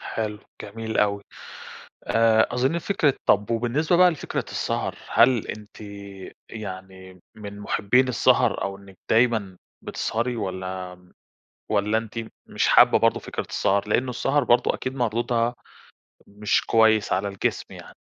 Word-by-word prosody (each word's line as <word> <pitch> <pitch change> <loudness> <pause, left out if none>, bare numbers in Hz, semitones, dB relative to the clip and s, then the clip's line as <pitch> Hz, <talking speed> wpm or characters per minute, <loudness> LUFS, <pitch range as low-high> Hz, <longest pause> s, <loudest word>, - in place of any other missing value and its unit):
حلو، 105 -2 -4 0.2
جميل 110 +2 -5
أوي. 100 -1 +1 0.8
آآ، 115 -1 +3
أظن 130 +7 +1
فكرة 160 -5 +1
طب 105 +2 +2
وبالنسبة 125 +9 +1
بقى 180 0 +6
لفكرة 155 - -4
السهر، - - -2
هل 120 -2 +3
أنتِ 105 0 -9 0.7
يعني 95 -3 -9
من 105 -1 -9
مُحبين 110 +5 +1
السهر 125 - +2
أو 100 0 -4
إنك 100 -1 -16
دايمًا 110 -5 +2 0.2
بتسهري 120 +2 -2
والّا 95 -3 -5 0.7
والّا 105 +2 +1
أنتِ 115 0 -7
م 115 -1 -5 0.2
مش - - 0
حابة - - +6
برضه - - +2
فكرة - - -6
السهر؟ 100 +1 0
لأنه 125 +4 +1
السهر 135 +3 0
برضه 120 0 +3
أكيد 130 0 -5
مردودها 120 -1 0 0.7
مش 105 +1 -1
كويس 110 -2 +3
على 95 +2 0
الجسم 100 -1 -2
يعني. - - -12
110 Hz, 135 wpm, -24 LUFS, 100-120 Hz, 0.8 s, بقى